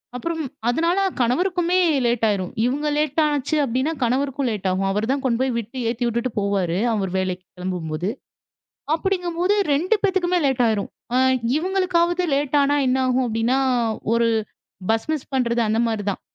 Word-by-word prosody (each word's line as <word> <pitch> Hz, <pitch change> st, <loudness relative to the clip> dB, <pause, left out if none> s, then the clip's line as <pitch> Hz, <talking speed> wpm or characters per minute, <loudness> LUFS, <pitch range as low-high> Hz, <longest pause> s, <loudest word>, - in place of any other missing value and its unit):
அப்புறம் 325 Hz, +5 st, -3 dB, 0.3 s
அதனால 335 Hz, +8 st, +1 dB, 0.2 s
கணவருக்குமே 355 Hz, +8 st, +1 dB, 0.3 s
லேட் 235 Hz, -1 st, 0 dB
ஆயிரும். 190 Hz, -4 st, -1 dB
இவங்க 290 Hz, +4 st, -1 dB
லேட்டாச்சு 300 Hz, 0 st, +1 dB
அப்படினா 260 Hz, +4 st, 0 dB
கணவருக்கும் 270 Hz, +2 st, 0 dB
லேட்டாகும். 195 Hz, -1 st, -1 dB
அவர் 210 Hz, +4 st, -1 dB
தான் 275 Hz, 0 st, -1 dB
கொண்டு 240 Hz, -2 st, +1 dB
போய் 260 Hz, -2 st, 0 dB
விட்டு 235 Hz, +3 st, -6 dB
ஏத்தி 240 Hz, +1 st, -2 dB
விட்டுட்டு 235 Hz, +1 st, -1 dB
போவாரு, 195 Hz, -4 st, 0 dB, 0.2 s
அவர் 195 Hz, -4 st, -1 dB
வேலைக்கு 185 Hz, -1 st, -2 dB
கிளம்பும்போது. 180 Hz, -1 st, -3 dB, 0.9 s
அப்படிங்கும்போது 360 Hz, +1 st, 0 dB, 0.2 s
2 345 Hz, +10 st, +2 dB
பேத்துக்குமே 365 Hz, -2 st, +2 dB
லேட் 260 Hz, -2 st, +1 dB
ஆயிரும். 215 Hz, -3 st, 0 dB, 0.3 s
அ -, -, +3 dB, 0.4 s
இவங்களுக்காவது 360 Hz, 0 st, +1 dB
லேட்டா 290 Hz, +1 st, +1 dB
ஆனா 285 Hz, +1 st, +2 dB
என்ன 255 Hz, +1 st, +2 dB
ஆகும்? 255 Hz, 0 st, +2 dB
அப்படின்னா, 230 Hz, +4 st, +1 dB, 0.5 s
ஒரு 230 Hz, 0 st, +3 dB, 0.6 s
பஸ் 225 Hz, 0 st, +1 dB
மிஸ் 300 Hz, -4 st, -4 dB
பண்றது 240 Hz, -2 st, +1 dB
அந்த 220 Hz, +1 st, +1 dB
மாரி 220 Hz, -3 st, -2 dB
தான். -, -, -5 dB
255 Hz, 145 wpm, -22 LUFS, 220-320 Hz, 0.9 s, அ